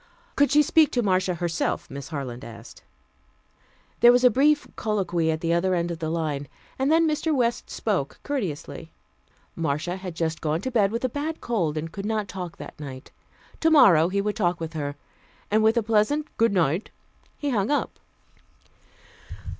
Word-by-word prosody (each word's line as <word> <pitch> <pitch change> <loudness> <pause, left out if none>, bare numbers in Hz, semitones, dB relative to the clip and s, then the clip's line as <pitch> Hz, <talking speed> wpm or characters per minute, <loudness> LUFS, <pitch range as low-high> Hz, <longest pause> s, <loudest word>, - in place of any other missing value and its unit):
Could 285 0 +4
she 300 +1 +5
speak 310 0 +4
to 245 - +1
Marcia 185 -2 +1
herself, 170 0 -2
Miss 140 0 -8
Harland 130 -5 -6
asked. 115 0 -11 1.2
There 240 - +8
was 245 +1 +3
a 250 - +7
brief 290 +5 +3
colloquy 180 -6 -1
at 160 0 -1
the 170 0 +1
other 185 +2 +1
end 170 0 -1
of 165 - -5
the 160 - -3
line, 155 -4 -2 0.3
and 270 +3 +2
then 325 0 +4
Mr. 310 +1 0
West 240 -2 0
spoke - - -2
courteously. 175 - -4 0.6
Marcia 165 +3 -2
had 185 -3 -7
just 160 -1 -2
gone 155 0 0
to 260 - -3
bed 205 -5 +2
with 230 +3 -2
a - - +3
bad 295 +5 -4
cold, 170 -10 -1
and 160 +1 -4
could 200 +2 -5
not 215 -2 -1
talk 180 -3 -7
that - - -10
night. 135 -3 -9 0.5
Tomorrow 245 - +6
he 200 +1 0
would 210 +1 -2
talk 180 -5 0
with 165 0 -5
her. 145 -2 -4 0.6
And 215 +1 +4
with 220 +2 +3
a 230 - +2
pleasant 225 +8 +1
"Goodnight," 185 -5 +1 0.5
he 290 -1 -2
hung 205 -3 0
up. 290 - -1
190 Hz, 175 wpm, -25 LUFS, 160-240 Hz, 1.2 s, There